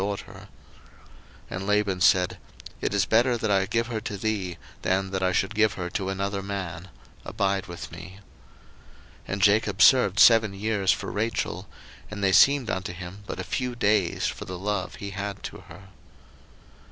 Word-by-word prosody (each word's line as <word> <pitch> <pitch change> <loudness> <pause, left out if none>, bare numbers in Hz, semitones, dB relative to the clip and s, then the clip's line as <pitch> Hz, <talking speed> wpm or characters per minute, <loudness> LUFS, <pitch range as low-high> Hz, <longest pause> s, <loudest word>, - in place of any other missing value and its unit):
01:029:019 100 0 -5 1.0
And 95 +2 -4
Laban 105 -3 +1
said, 90 +1 +3 0.4
It - - -1
is - - +2
better 120 +2 +3
that 110 -2 -1
I 95 -1 +2
give 115 +3 0
her 115 -2 -4
to 105 -2 -5
thee, 95 -4 -2 0.2
than 95 +1 0
that 95 -1 -2
I 95 0 +2
should 95 +4 0
give 110 -1 +3
her 90 -1 -5
to 95 +1 -2
another 100 +1 -2
man: 95 -3 -5 0.3
abide 100 0 -1
with 85 -1 -8
me. 95 +2 -10 1.1
01:029:020 - - -4
And 100 - -3
Jacob 105 -1 +3
served 115 -8 +5
seven 110 -4 +6
years 100 -2 +1
for - - -3
Rachel; 105 -3 -2 0.4
and 105 -1 -6
they 95 - +3
seemed 140 - +5
unto 95 -1 -3
him 90 +3 -9
but - - -5
a - - -3
few 125 -2 -3
days, 105 -6 +1
for - - -3
the 90 - -6
love 105 +3 -3
he 100 0 -7
had 100 0 -5
to - - -6
her. 95 +4 -13
100 Hz, 175 wpm, -26 LUFS, 95-110 Hz, 1.1 s, seven